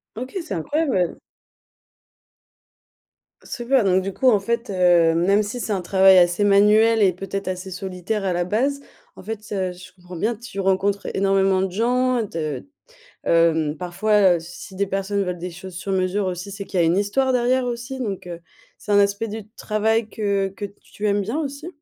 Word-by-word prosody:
OK. 255 - -7
C'est 325 - -6
incroyable 275 - 0
heu 180 -2 0 2.3
Super! 245 +1 0
Donc 190 -1 +3
du 195 +1 -4
coup, 260 - +3
en 210 - +3
fait, 235 +4 -2
heu, 175 -3 +4
même 195 +5 +3
si 210 +4 -5
c'est 220 -3 -2
un 190 - -1
travail 190 +1 +5
assez 175 +2 +4
manuel 210 +3 +5
et 190 -3 +4
peut-être 195 +1 -5
assez 185 +1 -4
solitaire 190 +2 -4
à 185 - 0
la 175 0 0
base, 260 +9 0 0.4
en - - -11
fait, 220 +1 -5
heu, 185 -3 -2
si 180 +1 -12
je - - -22
comprends 180 0 -12
bien, 220 +7 -1
tu 225 -3 -9
rencontres 195 +1 0
énormément 195 -1 +2
de 190 - 0
gens 245 +4 +1
de 155 -7 -4 0.6
hem, 160 -2 +2
parfois, 185 +2 +2
heu, - - -5
si 175 +3 -11
des 200 +1 -1
personnes 195 +1 -1
veulent 180 -1 -4
des 180 +2 -5
choses 180 +1 -10
sur 190 +2 -4
mesure 190 +1 0
aussi, 180 +2 -4
c'est 200 0 -6
qu'il 190 -2 -2
y - - +5
a 165 - +3
une 170 - +2
histoire 235 +7 +1
derrière 250 +1 +2
aussi, 240 +2 -5
donc 200 -7 -4
heu, 170 -1 -7 0.4
c'est - - -9
un 205 - +5
aspect 200 +2 +1
du 215 0 -7
travail 220 0 0
que 200 -3 -1
que 205 - -5 0.2
tu 210 - -5
aimes 205 0 +2
bien 225 +9 -3
aussi? 285 +1 -5
195 Hz, 195 wpm, -22 LUFS, 185-220 Hz, 2.3 s, travail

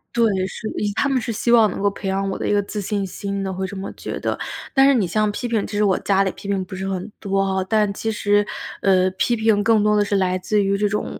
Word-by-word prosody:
对， 235 -1 +4 0.2
是 215 +3 -6
呃， - - -6 0.2
他 - - +1
们 270 -2 +1
是 230 - -3
希 225 +2 0
望 225 -3 +6
能 190 - -5
够 200 - +3
培 200 - -7
养 195 +1 0
我 - - -3
的 - - -2
一 - - +2
个 205 - +3
自 205 +1 -5
信 200 0 -2
心 200 +1 -4
的， 190 -1 -3
会 190 +1 -3
这 200 - -8
么 190 0 -5
觉 - - -6
得。 - - -2 0.4
但 270 0 +6
是 280 - +5
你 230 -7 +2
像 210 +4 +1
批 240 +4 -4
评， 225 -3 0
其 210 - -4
实 210 - +3
我 195 -3 +3
家 195 -1 +2
里 190 - -1
批 - - -11
评 195 -1 0
不 190 - -8
是 190 +1 -4
很 190 +2 -4
多 195 -1 0
吼。 190 -1 0
但 210 +1 +1
其 225 +2 -2
实， 205 -1 +2 0.4
呃， 185 -1 +3
批 215 +6 0
评 220 -2 +2
更 220 -1 +4
多 210 0 +3
地 210 - +3
是 205 0 -1
来 185 -1 +1
自 205 +3 +1
于 195 0 +1
这 210 +1 +1
种 210 +1 -3
205 Hz, 310 characters per minute, -21 LUFS, 195-215 Hz, 0.4 s, 望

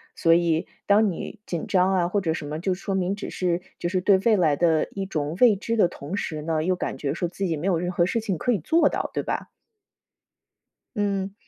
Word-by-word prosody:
所 165 - +4
以 165 -1 +2 0.2
当 205 +1 +5
你 190 +5 -7
紧 170 -3 -4
张 185 0 +3
啊， 175 -2 +2
或 200 +3 0
者 165 -5 -1
什 155 - -5
么 150 +2 -4
就 185 +2 0
说 195 +1 -3
明 190 +1 0
只 200 - -6
是 175 -1 -1 0.2
就 175 - -2
是 185 0 0
对 195 +1 +5
未 220 +3 +3
来 160 -7 +3
的 160 -1 +2
一 195 -1 -3
种 155 -3 -3
未 235 -5 +6
知 230 +4 -3
的 195 -5 +5
同 170 +3 -6
时 155 -6 -3
呢， 155 0 -1
又 185 +2 +1
感 - - -4
觉 140 -1 -2
说 175 +2 -2
自 190 +3 -4
己 165 -3 0
没 160 +6 -3
有 185 -3 +2
任 175 +2 -2
何 175 -1 +2
事 230 - 0
情 205 -6 -2
可 250 - 0
以 230 - +2
做 320 - +3
到， - - -3
对 - - -1
吧？ - - -3 1.5
嗯， 200 -1 -1
180 Hz, 255 characters per minute, -25 LUFS, 165-200 Hz, 1.5 s, 未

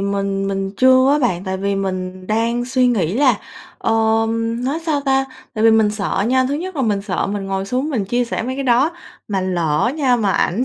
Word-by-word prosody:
mình 195 0 -1
mình 195 0 -2
chưa 260 +2 +5
á 295 - +3
bạn, 190 -9 0
tại 190 -1 -2
vì 200 +1 -1
mình 185 -1 -4
đang 230 +3 0
suy 255 0 +2
nghĩ 195 -7 +1
là, 255 -4 +3 0.4
ờm, 225 +1 0
nói 280 +5 -1
sao 310 -3 0
ta, 270 -1 +1 0.3
tại 215 -1 0
vì 225 - +7
mình 220 -1 +4
sợ 205 -1 -1
nha, 260 0 +3
thứ 280 - -1
nhất 355 +3 -5
là 270 - 0
mình 205 -4 0
sợ 200 -3 -2
mình 200 -1 -4
ngồi 195 0 -2
xuống 255 +9 -2
mình 225 -8 -1
chia 240 +5 0
sẻ 235 - -3
mấy 255 +3 -3
cái 275 +1 -4
đó, 255 +5 +3 0.4
mà 195 -2 -1
lỡ 175 +2 0
nha 260 -5 +2
mà 210 -4 0
ảnh 220 +9 +1
225 Hz, 225 wpm, -19 LUFS, 195-255 Hz, 0.4 s, vì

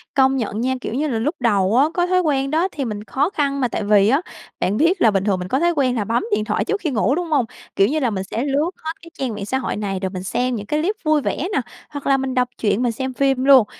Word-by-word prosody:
Công 265 -1 +4
nhận 220 -3 -2
nha. 260 +2 0
Kiểu 230 - -5
như 300 +4 0
là 235 -5 -1
lúc 285 +9 -1
đầu 205 -3 +2
á, 270 - +6
có 350 0 +2
thói 365 0 +2
quen 275 -5 0
đó 325 +5 +2
thì 280 - -3
mình 210 -3 -5
khó 285 +9 0
khăn 280 -6 -1
mà, 250 - +2
tại 215 - -3
vì 205 -1 +4
á 275 +6 +3 0.4
bạn 200 - +1
biết 340 - +2
là 225 - +6
bình 195 -1 0
thường 200 -3 +1
mình 180 0 -5
có 265 - +1
thói 345 +1 +3
quen 255 -4 +1
là 215 - 0
bấm 230 +4 0
điện 210 0 0
thoại 210 -1 -1
trước 415 - -1
khi 315 - -1
ngủ, 255 +1 +1
đúng 345 0 -3
hông? 285 -5 +3 0.3
Kiểu 195 - +4
như 310 +3 0
là 250 -4 +1
mình 190 -2 -3
sẽ 230 +5 -3
lướt 290 +4 +1
hết 320 - -2
cái 335 - -13
trang 255 -5 -2
mạng 205 -1 -5
xã 265 - 0
hội 265 - -3
này 195 -2 -3
rồi 190 -1 -2
mình 185 -1 -6
xem 250 +6 -1
những 210 -3 -5
cái 300 +7 0
clip 405 +6 0
vui 310 -1 +3
vẻ - - -1 0.2
nè, 275 - +2 0.3
hoặc 285 -2 -7
là 275 - +4
mình 265 -1 -3
đọc 250 -1 +2
truyện, 215 +1 +1
mình 240 -2 +1
xem 260 +3 -4
phim 270 -1 +1
luôn. 265 -5 +7
260 Hz, 305 wpm, -21 LUFS, 215-290 Hz, 0.4 s, luôn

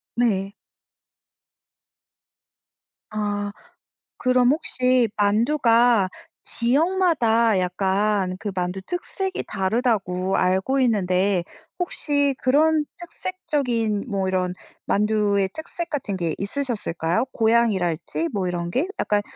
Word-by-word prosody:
네. 200 -5 +1 2.6
아. 205 -1 -2 0.7
그럼 255 -1 +3
혹시 255 -5 +2
만두가 230 0 +3 0.4
지역마다 245 - +2
약간 190 +1 0
그 205 - -3
만두 180 +1 -2
특색이 375 - -4
다르다고 195 -3 0
알고 190 +9 +1
있는데 190 -5 +2 0.3
혹시 285 -5 0
그런 305 +4 +3
특색적인 280 - -2
뭐 195 -3 -1
이런 185 -1 0 0.3
만두의 205 -2 +1
특색 335 +2 -5
같은 260 -11 -3
게 170 -3 -1
있으셨을까요? 200 -5 -1
고향이랄지 190 -9 +1
뭐 190 -4 -1
이런 175 -1 -3
게? 295 - 0
약간 205 -1 +1
215 Hz, 205 characters per minute, -23 LUFS, 190-255 Hz, 2.6 s, 그럼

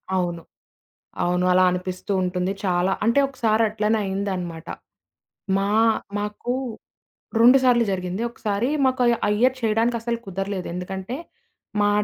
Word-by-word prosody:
అవును. 175 -2 -1 0.8
అవును. 180 +1 +1
అలా 185 0 +5
అనిపిస్తూ 180 +2 -4
ఉంటుంది. 180 +1 -1
చాలా 180 0 +1
అంటే 235 +5 +4
ఒకసారి 230 -4 +1
అట్లనే 215 +1 0
అయిందనమాట. 185 -4 -3 0.9
మా 195 0 0 0.5
మాకు 210 +4 -3 0.9
2 250 +3 +8
సార్లు 245 -2 +4
జరిగింది. 185 +2 -3
ఒకసారి 220 +1 -2 0.2
మాకు 260 0 +1 0.2
ఆ - - +1
ఇయర్ 255 +2 +3
చేయడానికి 225 +2 +1
అస్సలు 235 0 -2
కుదరలేదు. 195 0 -3
ఎందుకంటే 190 +5 -5 0.7
మా 205 - +4
200 Hz, 120 wpm, -23 LUFS, 180-230 Hz, 0.9 s, 2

